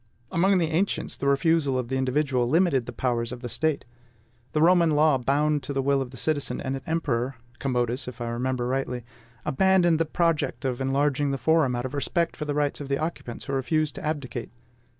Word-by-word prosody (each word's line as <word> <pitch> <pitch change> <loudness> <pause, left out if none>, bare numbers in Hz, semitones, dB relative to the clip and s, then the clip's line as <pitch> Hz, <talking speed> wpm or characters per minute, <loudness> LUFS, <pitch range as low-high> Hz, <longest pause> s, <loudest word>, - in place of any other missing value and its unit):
Among 190 +3 +3
the 165 -2 +1
ancients, 185 +6 0
the 140 - -3
refusal 140 -1 +2
of 125 -2 -3
the 135 - -1
individual 130 -1 +1
limited 160 -7 +2
the - - -4
powers 120 -2 -1
of 120 - -7
the 120 - -4
State. 150 +6 -1 0.7
The 155 - +2
Roman 170 -1 +5
law 150 -2 +4
bowed 145 +3 +1
to 140 - -5
the 135 - 0
will 140 0 +2
of 130 - -4
the 130 - -11
citizen, 145 +2 -1
and 130 0 -2
an 135 - -5
emperor 135 -6 -1 0.2
Commodus, 125 -2 -1
if 125 -1 -8
I 120 -1 -3
remember 125 +1 -1
rightly 125 -1 -2 0.4
abandoned 175 +1 +3
the 165 - +2
project 165 -3 0
of 130 -1 -1
enlarging 140 +1 +1
the 135 - -1
forum 135 -1 +2
out 120 +1 -3
of 130 - -5
respect 170 +4 -1
for 150 - -5
the 145 -1 -2
rights 145 0 0
of 140 - -5
the 140 0 0
occupants 155 -7 -5
who 140 - -4
refused 155 +3 0
to - - -8
abdicate. 140 -6 -3
140 Hz, 210 wpm, -26 LUFS, 130-155 Hz, 0.7 s, Roman